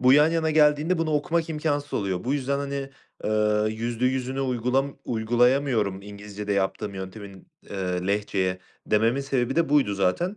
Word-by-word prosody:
Bu 130 +1 +6
yan 150 +2 +6
yana 160 -1 +1
geldiğinde 155 +3 +3
bunu 160 -1 0
okumak 160 +3 0
imkânsız 145 -2 -2
oluyor. 95 -1 -1
Bu 135 +3 0
yüzden 140 0 -1
hani, 140 -1 -4 0.3
eee, 105 0 +2
yüzde 120 +2 -2
yüzüne 130 +1 -1
uygulam 130 +2 0
uygulayamıyorum 120 -3 +1
İngilizce'de 105 0 -6
yaptığım 100 +1 -1
yöntemin, 95 0 -9 0.2
eee, 90 -2 -2
Lehçeye 100 -2 0 0.3
dememin 115 +5 +2
sebebi 135 0 -1
de 165 -2 +3
buydu 140 -9 +3
zaten. 100 - 0
125 Hz, 150 wpm, -25 LUFS, 105-140 Hz, 0.3 s, Bu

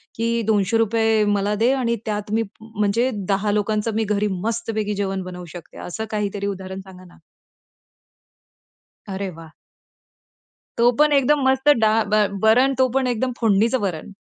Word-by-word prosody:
की 230 +1 0
₹200 220 +1 +2
मला 205 0 +1
दे 230 +5 +2
आणि 235 -3 0
त्यात 210 0 -3
मी 225 0 +2 0.2
म्हणजे 220 +2 0 0.2
10 200 +1 +1
लोकांचं 210 +1 0
मी 220 - +1
घरी 210 0 0 0.2
मस्तपैकी 220 -2 -2
जेवण 195 -1 -2
बनवू 180 -1 -8
शकते, 175 - -11
असं 220 +5 -5
काहीतरी 205 -1 -2
उदाहरण 190 -1 -5
सांगा 185 -1 -14
ना? 175 - -18 1.9
अरे 195 0 -3
वाह! 165 -1 -12 1.3
तो 240 +1 +5
पण 300 0 +5
एकदम 280 +1 +3
मस्त 265 +2 +2
डाळ 220 0 +3
भा 215 -1 +4 0.2
वरण 250 +5 +4
तो 260 - +5
पण 265 -1 +2
एकदम 250 +1 -1
फोडणीचं 225 +3 +3
वरण. 190 -2 -4
215 Hz, 145 wpm, -22 LUFS, 200-230 Hz, 1.9 s, तो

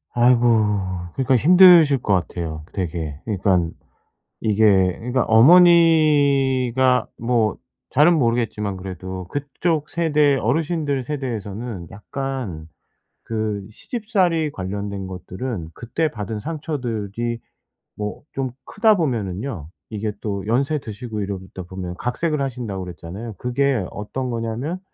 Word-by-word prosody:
아이고. 120 0 +5 0.7
그러니까 130 0 +2
힘드실 170 - +7
것 100 - +1
같아요, 80 -3 -2
되게. 80 -5 -4
그니깐 95 -5 +1 0.7
이게 100 -4 +3
그니까 125 +1 0
어머니가 140 -4 +5
뭐 115 -3 +1 0.3
잘은 155 +4 +5
모르겠지만 115 -5 0
그래도 95 0 -7
그쪽 145 - -2
세대 150 -4 +2
어르신들 145 +2 0
세대에서는 115 - -5
약간 105 - -5 0.6
그 110 -3 -3
시집살이 185 - -1
관련된 100 -1 -5
것들은 95 0 -6
그때 155 +7 -2
받은 105 0 -5
상처들이 120 -7 -4 0.6
뭐 105 0 -5
좀 135 -2 -2
크다 215 +1 +3
보면은요, 110 - -3 0.2
이게 105 -1 -3
또 100 -2 -3
연세 140 +7 +1
드시고 110 -2 -6
이러다 95 -2 -6
보면 90 -1 -6
각색을 150 - -1
하신다고 115 -8 -4
그랬잖아요. 90 +6 -8
그게 125 -3 0
어떤 125 +5 -4
거냐면 120 +9 -3
120 Hz, 270 characters per minute, -22 LUFS, 100-140 Hz, 0.7 s, 힘드실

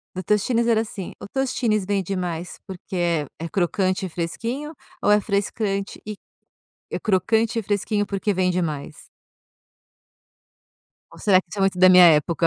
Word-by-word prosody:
Do 185 - -3
Tostines 225 +4 +1
era 220 -1 +3
assim: 205 -4 -7
"O - - -7
Tostines 230 -4 -1
vende 195 -2 -1
mais 175 -1 -4
porque 190 0 -8
é 170 -4 0
é 165 +1 -5
crocante 185 0 0
e - - -3
fresquinho, 235 - -4 0.3
ou - - +3
é 210 0 +5
frescante 200 0 -2
e 210 - -5 0.7
é - - -3
crocante 220 +3 +1
e 225 - -1
fresquinho 205 +1 -1
porque 200 +1 -1
vende 180 -1 +1
mais?". 150 -1 -5 2.1
Ou - - -15
será 195 -4 +4
que 185 - -27
isso 205 - -7
é - - -1
muito 195 -1 +1
da 185 0 +7
minha 180 -1 +9
época? 165 +2 +3
195 Hz, 165 wpm, -23 LUFS, 180-210 Hz, 2.1 s, minha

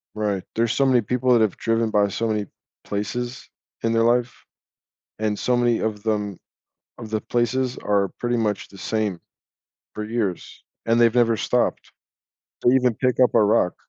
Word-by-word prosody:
Right, 105 -3 -1
there's 115 0 +1
so 140 - +2
many 125 -3 +4
people 125 +4 0
that 120 - +4
have 110 -3 +1
driven 115 0 0
by 105 -1 +3
so 115 +4 -2
many 105 -2 -1 0.4
places 120 +5 -4 0.3
in 115 0 0
their 115 0 +3
life, 120 +1 0 0.7
and 105 -1 -1
so 125 +4 +1
many 120 -1 +2
of 105 -1 -3
them 105 -3 -1 0.6
of 110 -2 -9
the 110 -1 -1
places 120 +2 -1
are 100 -2 +1
pretty 120 0 0
much 105 -3 -1
the 100 - -14
same 105 -3 -2 0.7
for 105 - -5
years, 105 -5 -3 0.2
and 115 +1 +3
they've 115 -1 +5
never 115 -2 +3
stopped. - - -1 0.7
They 120 - +4
even 125 -3 +3
pick 125 +3 0
up 125 -1 +4
a - - +5
rock. 105 -4 +2
115 Hz, 175 wpm, -23 LUFS, 105-120 Hz, 0.7 s, they've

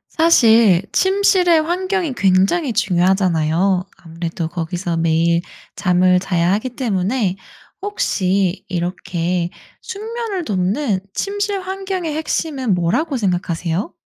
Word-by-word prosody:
사실 230 - +5
침실의 375 -4 +3
환경이 360 -1 -1
굉장히 200 - +2
중요하잖아요. 185 -3 +1
아무래도 165 0 -5
거기서 175 +1 -3
매일 165 +1 +2 0.3
잠을 180 0 +3
자야 175 -2 0
하기 215 +6 -1
때문에 205 -3 0 0.5
혹시 195 - 0
이렇게 175 -1 -2 0.3
숙면을 430 -3 -5
돕는 200 +3 0 0.2
침실 405 0 -2
환경의 375 -3 -4
핵심은 290 - -1
뭐라고 255 - 0
생각하세요? 180 -3 -2
195 Hz, 260 characters per minute, -19 LUFS, -, 0.5 s, 사실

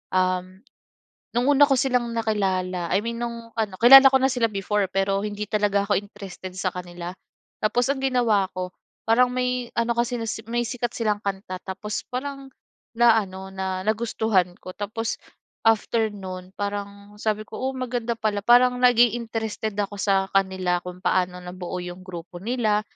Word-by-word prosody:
um, 185 0 0 0.8
nung 245 +2 +2
una 290 0 +7
ko 275 - +3
silang 250 -2 +1
nakilala 190 -5 -1
I 195 - +3
mean 235 0 -4
nung 235 -1 -5
ano, 215 -4 -1
kilala 270 +3 +11
ko - - +3
na 265 - +3
sila 245 -2 +2
before 200 0 0
pero 195 0 +1
hindi 210 0 -4
talaga 205 -1 +1
ako 205 - +3
interested 195 -2 -10
sa 185 -1 -1
kanila. 175 -1 -6 0.5
Tapos 240 +4 +2
ang 280 - -3
ginawa 235 -7 +2
ko 180 0 -4 0.4
parang 240 +3 +5
may 250 -1 -1
ano 235 0 +1
kasi 240 +1 +1 0.3
may 240 +1 0
sikat 240 0 -3
silang 210 -3 0
kanta 195 -2 -4
tapos 200 +2 -4
parang 275 +2 -5 0.5
na-ano 205 -5 +3
na 190 -1 -3
nagustuhan 215 -4 +1
ko - - -9
tapos 225 +3 -3 0.5
after 225 0 +2
no'n 185 -2 -8
parang 200 0 -5
sabi 215 0 -1
ko, - - -8
"oh, 265 +1 -1
maganda 245 -2 -2
pala" 215 -2 0
parang 250 +1 +6
naging 245 -2 +5
interested 220 -2 -3
ako 205 0 -2
sa 195 -1 +1
kanila 190 -2 +1
kung 180 0 -8
paano 180 -1 +1
nabuo 180 0 -6
yung 180 +1 -8
grupo 175 -1 -8
nila, 215 0 +1
210 Hz, 160 wpm, -24 LUFS, 190-235 Hz, 0.8 s, kilala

